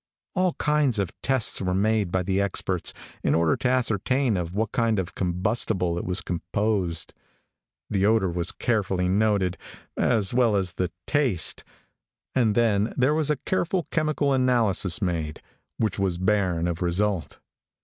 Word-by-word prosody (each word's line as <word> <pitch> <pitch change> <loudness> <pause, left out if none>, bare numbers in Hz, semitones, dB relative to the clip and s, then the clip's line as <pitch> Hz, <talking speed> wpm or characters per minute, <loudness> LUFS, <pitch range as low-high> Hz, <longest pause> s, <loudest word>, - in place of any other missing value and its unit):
All 185 -2 +1
kinds 150 -6 +1
of 100 -4 -1
tests 130 -4 +1
were 90 -1 0
made 105 -1 +1
by 95 0 0
the 95 +2 0
experts, 95 -2 0 0.3
in - - +2
order 80 -1 +3
to 125 - 0
ascertain 125 0 +1
of 90 0 -3
what 110 0 -1
kind 115 -2 +1
of 95 -1 -3
combustible 90 0 0
it - - -5
was 90 +1 0
composed. 90 -1 -2 0.7
The 95 -2 0
odor 110 -5 +2
was 85 0 -1
carefully 95 -6 0
noted, 100 -1 +1 0.4
as 110 -5 +1
well 120 -4 +3
as 95 -3 0
the 90 -1 -1 0.2
taste, 130 - +1 0.7
and 115 -5 +2
then 110 -2 +2
there 130 +3 +3
was 155 -1 +1
a 150 - +3
careful 185 -1 0
chemical 155 -3 +1
analysis 120 -6 +2
made, 80 -4 -2 0.4
which 105 -4 -1
was 95 -3 0
barren 95 -3 +1
of 85 0 -3
result. 90 +1 -1
100 Hz, 150 wpm, -25 LUFS, 90-120 Hz, 0.7 s, order